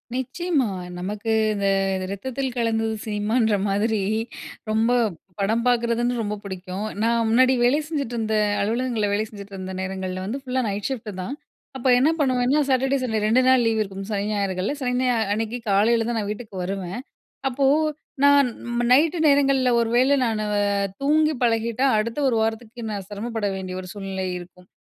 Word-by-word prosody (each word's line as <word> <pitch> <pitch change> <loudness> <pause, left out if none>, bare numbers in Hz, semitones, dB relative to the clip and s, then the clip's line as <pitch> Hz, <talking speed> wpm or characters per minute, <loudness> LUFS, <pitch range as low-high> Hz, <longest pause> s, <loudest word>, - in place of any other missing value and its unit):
நிச்சயமா, 265 +2 0 0.3
நமக்கு 205 +4 -3 0.2
இந்த 200 -1 -1 0.4
ரத்தத்தில் 260 +5 -4
கலந்தது 225 -1 0
சினிமான்ற 215 +1 +1
மாதிரி 210 +2 +1 0.7
ரொம்ப 220 +2 +2 0.5
படம் 220 +4 +1
பாக்கறதுன் 240 0 +2
ரொம்ப 210 -1 -2
புடிக்கும். 190 +1 -5 0.2
நான் 230 0 +2
முன்னாடி 255 +3 +5
வேலை 255 +5 +4
செஞ்சுட்டிருந்த 235 -8 -2 0.3
அலுவலகங்கள்ல 225 0 0
வேலை 210 +2 0
செஞ்சுட்ருந்த 195 -3 -8
நேரங்கள்ல 185 0 -4
வந்து 235 +8 -3
ஃபுல்லா 260 -1 -1
நைட் 200 0 -2
ஷிஃப்ட் 230 -5 -4
தான். 215 +9 -4 0.4
அப்ப 260 - -2
என்ன 275 +5 +4
பண்ணுவேனா 255 0 +2
சாட்டர்டே, 265 +1 +2
சண்டே 220 -3 0
2 235 +4 +4
நாள் 260 -1 +5
லீவ் 225 -1 +2
இருக்கும். 195 -1 -5
சனி, 200 -1 -1
ஞாயிறுகள்ல 195 +1 -1
சனி 250 -1 0
ஞாயிறு 250 -1 +2 0.2
அன்னிக்கு 225 +2 -2
காலைல 225 +4 +3
தான் 235 - -1
நான் 205 - -3
வீட்டுக்கு 210 -1 -8
வருவேன். 190 +1 -4 0.5
அப்போ, 270 +1 0 0.6
நான் 285 -1 +6 0.4
நைட்‌டு 310 +6 +5
நேரங்கள்ல 275 -2 +4
ஒரு 230 -1 +1
வேள 260 +3 +4
நானு 220 -2 -1 0.6
தூங்கி 305 +2 +3
பழகிட்டா 230 +1 +1
அடுத்த 230 +5 -1
ஒரு 240 - 0
வாரத்துக்கு 225 +1 -3
நான் 200 -2 -4
சிரமப்பட 220 +1 -4
வேண்டிய 185 -1 -5
ஒரு 185 - -10
சூழ்நிலை 195 -2 -4
இருக்கும். 180 +1 -14
225 Hz, 150 wpm, -23 LUFS, 205-255 Hz, 0.7 s, நான்